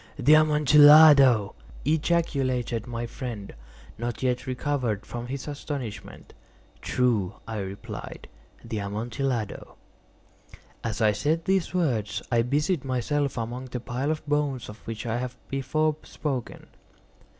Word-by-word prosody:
"The 145 Hz, +2 st, +5 dB
Amontillado!" 150 Hz, -6 st, +7 dB, 0.3 s
ejaculated 135 Hz, -7 st, 0 dB
my 120 Hz, 0 st, -4 dB
friend, 115 Hz, -4 st, -7 dB, 0.5 s
not 120 Hz, +1 st, -4 dB
yet 125 Hz, 0 st, 0 dB
recovered 125 Hz, -5 st, -2 dB
from 120 Hz, 0 st, -6 dB
his 135 Hz, +2 st, -5 dB
astonishment. 135 Hz, -8 st, -7 dB, 0.5 s
"True," 115 Hz, -8 st, 0 dB
I 110 Hz, -2 st, -4 dB
replied; 95 Hz, 0 st, -7 dB, 0.4 s
"the 110 Hz, -, -3 dB
Amontillado." 115 Hz, +3 st, -3 dB, 1.1 s
As 115 Hz, -1 st, -3 dB
I 110 Hz, -1 st, +5 dB
said 155 Hz, +10 st, -1 dB
these 190 Hz, -1 st, 0 dB
words 115 Hz, -, 0 dB
I 120 Hz, -1 st, +4 dB
busied 145 Hz, +6 st, 0 dB
myself 135 Hz, +2 st, -1 dB
among 120 Hz, +3 st, -4 dB
the 125 Hz, -1 st, -5 dB
pile 125 Hz, +3 st, -3 dB
of 155 Hz, 0 st, -2 dB
bones 145 Hz, -4 st, -1 dB
of 105 Hz, +1 st, -10 dB
which 115 Hz, 0 st, -5 dB
I 115 Hz, 0 st, -1 dB
have 125 Hz, 0 st, -5 dB
before 150 Hz, +3 st, 0 dB
spoken. 135 Hz, -6 st, -5 dB
125 Hz, 120 wpm, -26 LUFS, 115-145 Hz, 1.1 s, Amontillado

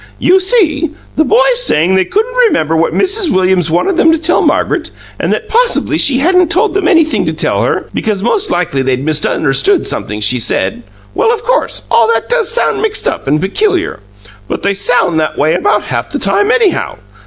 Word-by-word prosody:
"You 370 Hz, +2 st, +3 dB
see, 335 Hz, -7 st, 0 dB, 0.2 s
the 315 Hz, -, +2 dB
boys -, -, +2 dB
saying 170 Hz, -, +1 dB
they 190 Hz, -1 st, +2 dB
couldn't 445 Hz, -, -2 dB
remember 385 Hz, -, +1 dB
what 165 Hz, +1 st, +1 dB
Mrs. 390 Hz, -2 st, 0 dB
Williams 185 Hz, -2 st, +1 dB
wanted 180 Hz, -, 0 dB
them 325 Hz, -, +4 dB
to 325 Hz, -, +2 dB
tell 325 Hz, +2 st, +1 dB
Margaret, -, -, 0 dB, 0.3 s
and -, -, -1 dB
that -, -, -3 dB
probably 485 Hz, +1 st, +1 dB
she 260 Hz, -, +3 dB
hadn't 360 Hz, +4 st, +2 dB
told 390 Hz, +5 st, +1 dB
them 395 Hz, 0 st, 0 dB
anything 315 Hz, -, +2 dB
to 160 Hz, -, -1 dB
tell 155 Hz, -, -1 dB
her, -, -, -1 dB
because 205 Hz, -3 st, -2 dB
most 395 Hz, -, -1 dB
likely 160 Hz, -6 st, -1 dB
they'd 130 Hz, 0 st, -1 dB
misunderstood 155 Hz, -, +1 dB
something 105 Hz, 0 st, -5 dB
she 105 Hz, +4 st, +1 dB
said 235 Hz, -, -1 dB, 0.3 s
well, 465 Hz, -1 st, +1 dB
of 460 Hz, -1 st, -3 dB
course, -, -, -1 dB
all 230 Hz, -1 st, +4 dB
that 225 Hz, -, -4 dB
does 480 Hz, -4 st, 0 dB
sound 470 Hz, -, 0 dB
mixed 435 Hz, -1 st, -1 dB
up -, -, -3 dB
and 150 Hz, +3 st, +1 dB
peculiar; 365 Hz, -, -1 dB, 0.5 s
but -, -, -5 dB
they 200 Hz, -, +1 dB
sound 195 Hz, -5 st, 0 dB
that 155 Hz, -, -2 dB
way 155 Hz, +2 st, +1 dB
about 410 Hz, -, 0 dB
half -, -, -4 dB
the -, -, -4 dB
time, 410 Hz, +1 st, 0 dB
anyhow. 455 Hz, -6 st, 0 dB
320 Hz, 195 wpm, -12 LUFS, -, 0.5 s, them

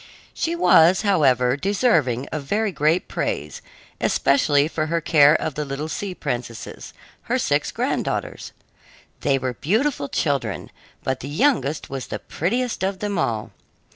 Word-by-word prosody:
She 335 Hz, +1 st, -1 dB
was, 185 Hz, -, +5 dB
however, 130 Hz, -, +3 dB
deserving 155 Hz, -, +1 dB
of 155 Hz, -, -3 dB
very 205 Hz, +9 st, -1 dB
great 155 Hz, +2 st, +1 dB
praise, -, -, -3 dB, 0.4 s
especially 145 Hz, -, +3 dB
for 155 Hz, -1 st, -2 dB
her 170 Hz, +1 st, 0 dB
care 155 Hz, -2 st, +5 dB
of 160 Hz, -, -1 dB
the 150 Hz, -, -3 dB
little 140 Hz, +2 st, -4 dB
sea 190 Hz, +3 st, -4 dB
princesses, 120 Hz, -7 st, -5 dB, 0.4 s
her -, -, +2 dB
six -, -, 0 dB
granddaughters. -, -, -2 dB, 0.7 s
They 140 Hz, -1 st, +2 dB
were 130 Hz, -1 st, -2 dB
beautiful 215 Hz, -, 0 dB
children, 130 Hz, -, -2 dB, 0.3 s
but 130 Hz, -1 st, -1 dB
the 140 Hz, -, -7 dB
youngest 155 Hz, -, 0 dB
was 135 Hz, -2 st, -5 dB
the -, -, -4 dB
prettiest 240 Hz, +9 st, -2 dB
of 190 Hz, 0 st, -1 dB
them 205 Hz, -2 st, -2 dB
all. 110 Hz, -8 st, -2 dB
155 Hz, 140 wpm, -22 LUFS, 135-195 Hz, 0.7 s, was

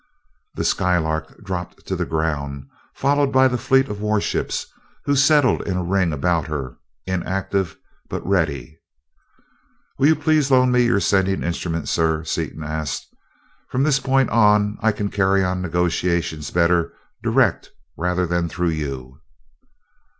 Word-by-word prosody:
The -, -, -2 dB
Skylark 80 Hz, 0 st, 0 dB
dropped 90 Hz, -3 st, -6 dB
to -, -, -2 dB
the -, -, -2 dB
ground, 70 Hz, -4 st, -2 dB, 0.3 s
followed 140 Hz, 0 st, +1 dB
by 130 Hz, 0 st, +5 dB
the 125 Hz, -, -1 dB
fleet 135 Hz, +2 st, +3 dB
of 105 Hz, -3 st, -6 dB
warships, 105 Hz, -1 st, -1 dB, 0.4 s
who 140 Hz, 0 st, +2 dB
settled 145 Hz, -1 st, +4 dB
in 95 Hz, -2 st, -3 dB
a 90 Hz, -, -1 dB
ring 90 Hz, -1 st, +1 dB
about 80 Hz, +1 st, 0 dB
her 70 Hz, -6 st, -5 dB, 0.3 s
inactive, 95 Hz, 0 st, -2 dB, 0.3 s
but -, -, -5 dB
ready. 80 Hz, -6 st, -1 dB, 1.2 s
"Will 140 Hz, -, +5 dB
you 160 Hz, -, +5 dB
please 155 Hz, -3 st, +2 dB
loan 130 Hz, -1 st, +4 dB
me 125 Hz, 0 st, +4 dB
your 105 Hz, -, +2 dB
sending 95 Hz, -1 st, +1 dB
instrument, 85 Hz, -1 st, -3 dB
sir?" 80 Hz, -1 st, +1 dB
Seaton 80 Hz, 0 st, -4 dB
asked. 75 Hz, -2 st, -4 dB, 0.6 s
"From 130 Hz, +1 st, 0 dB
this 140 Hz, -2 st, +3 dB
point 135 Hz, 0 st, +1 dB
on 105 Hz, -2 st, +3 dB
I 110 Hz, 0 st, +3 dB
can 105 Hz, -1 st, -3 dB
carry 95 Hz, -1 st, +2 dB
on 90 Hz, 0 st, -1 dB
negotiations 85 Hz, -2 st, -1 dB
better 85 Hz, -1 st, +2 dB, 0.3 s
direct -, -, +1 dB, 0.3 s
than 90 Hz, -1 st, 0 dB
through 90 Hz, +1 st, -1 dB
you." 70 Hz, -4 st, -5 dB
90 Hz, 140 wpm, -21 LUFS, 80-105 Hz, 1.2 s, by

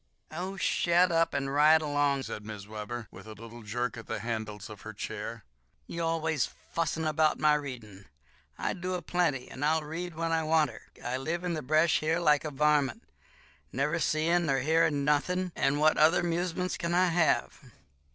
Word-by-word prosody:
"Oh, 185 Hz, +5 st, -5 dB
shet 175 Hz, 0 st, +3 dB
up 165 Hz, 0 st, +2 dB
and 135 Hz, 0 st, -1 dB
ride 155 Hz, +2 st, +5 dB
along," 145 Hz, -2 st, +1 dB
said 105 Hz, -, -6 dB
Mrs. 105 Hz, -2 st, -8 dB
Webber, 110 Hz, +2 st, -6 dB
with -, -, -12 dB
a 110 Hz, -, -8 dB
little 115 Hz, +2 st, -11 dB
jerk 120 Hz, +3 st, -3 dB
at 115 Hz, -, -9 dB
the -, -, -4 dB
handles 110 Hz, -2 st, -4 dB
of 105 Hz, -1 st, -11 dB
her 110 Hz, -, -8 dB
chair; 100 Hz, -, -6 dB, 0.4 s
"you 170 Hz, -, -5 dB
always 160 Hz, -3 st, 0 dB, 0.3 s
fussin' 165 Hz, -1 st, -1 dB
'bout 155 Hz, -1 st, +3 dB
my 150 Hz, -1 st, +4 dB
readin'. 120 Hz, -9 st, -5 dB, 0.5 s
I -, -, -1 dB
do 185 Hz, 0 st, -3 dB
a 175 Hz, -, -5 dB
plenty; 160 Hz, -7 st, 0 dB
and 130 Hz, -, -7 dB
I'll 155 Hz, +1 st, +2 dB
read 165 Hz, +3 st, -5 dB
when 165 Hz, +1 st, -2 dB
I 165 Hz, 0 st, +2 dB
wanter. 155 Hz, -6 st, 0 dB, 0.2 s
I 125 Hz, +1 st, -1 dB
live 160 Hz, +6 st, -3 dB
in 175 Hz, -1 st, -1 dB
the 155 Hz, -, -3 dB
bresh 155 Hz, +4 st, +3 dB
here 160 Hz, +2 st, 0 dB
like 150 Hz, -4 st, +3 dB
a 155 Hz, -, -3 dB
varmint, 150 Hz, -, +1 dB, 0.7 s
never 150 Hz, +5 st, 0 dB
seein' 165 Hz, +2 st, +1 dB
nor 135 Hz, -2 st, +2 dB
hearin' 150 Hz, -1 st, +2 dB
nothin', 180 Hz, +5 st, +1 dB
and 135 Hz, +2 st, +1 dB
what 155 Hz, +1 st, +4 dB
other 165 Hz, +3 st, +5 dB
'musement 175 Hz, +1 st, -1 dB
kin 170 Hz, 0 st, -1 dB
I 180 Hz, 0 st, +4 dB
have? 165 Hz, -1 st, +1 dB
155 Hz, 185 wpm, -29 LUFS, 130-165 Hz, 0.7 s, ride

